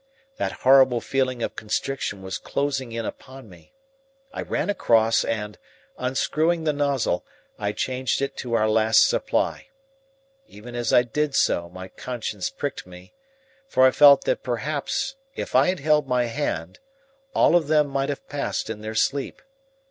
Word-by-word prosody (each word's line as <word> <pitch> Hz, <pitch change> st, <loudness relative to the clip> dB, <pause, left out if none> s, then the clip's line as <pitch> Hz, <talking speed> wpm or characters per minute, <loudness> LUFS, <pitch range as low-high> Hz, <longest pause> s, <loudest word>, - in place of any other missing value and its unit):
That -, -, -1 dB
horrible 130 Hz, -2 st, +6 dB
feeling 130 Hz, -1 st, -1 dB
of -, -, -3 dB
constriction 110 Hz, -2 st, -3 dB
was 95 Hz, 0 st, -5 dB
closing 135 Hz, -3 st, -2 dB
in 115 Hz, -1 st, -4 dB
upon 130 Hz, +1 st, -9 dB
me. 90 Hz, -4 st, -17 dB, 0.6 s
I -, -, -4 dB
ran -, -, -2 dB
across 115 Hz, -, +3 dB
and, 105 Hz, -3 st, -4 dB, 0.4 s
unscrewing 155 Hz, +6 st, 0 dB
the 155 Hz, -1 st, +1 dB
nozzle, 140 Hz, -10 st, 0 dB, 0.4 s
I 105 Hz, -1 st, -2 dB
changed 130 Hz, +4 st, -1 dB
it 140 Hz, 0 st, -2 dB
to 120 Hz, -3 st, -5 dB
our 110 Hz, -1 st, +2 dB
last 110 Hz, +1 st, +4 dB
supply. -, -, -1 dB, 0.8 s
Even 115 Hz, +4 st, -12 dB
as 120 Hz, -2 st, -1 dB
I 120 Hz, -, +6 dB
did 140 Hz, +4 st, -2 dB
so 85 Hz, 0 st, +1 dB
my 95 Hz, +1 st, -9 dB
conscience 110 Hz, -3 st, -5 dB
pricked 140 Hz, -8 st, -5 dB
me, 90 Hz, 0 st, -14 dB, 0.5 s
for 130 Hz, -, +4 dB
I 130 Hz, -, +6 dB
felt 140 Hz, -1 st, +7 dB
that -, -, 0 dB
perhaps 145 Hz, -, -3 dB, 0.2 s
if -, -, -5 dB
I 130 Hz, +2 st, +5 dB
had 185 Hz, -5 st, -1 dB
held 150 Hz, -1 st, +2 dB
my 125 Hz, -1 st, +1 dB
hand 115 Hz, -, -3 dB, 0.6 s
all -, -, +4 dB
of 165 Hz, -4 st, +2 dB
them 150 Hz, -1 st, +4 dB
might 135 Hz, 0 st, -2 dB
have 145 Hz, -, -5 dB
passed 145 Hz, -5 st, -3 dB
in 105 Hz, -1 st, -7 dB
their 110 Hz, +1 st, -6 dB
sleep. 135 Hz, +5 st, -1 dB
130 Hz, 160 wpm, -24 LUFS, 110-140 Hz, 0.8 s, felt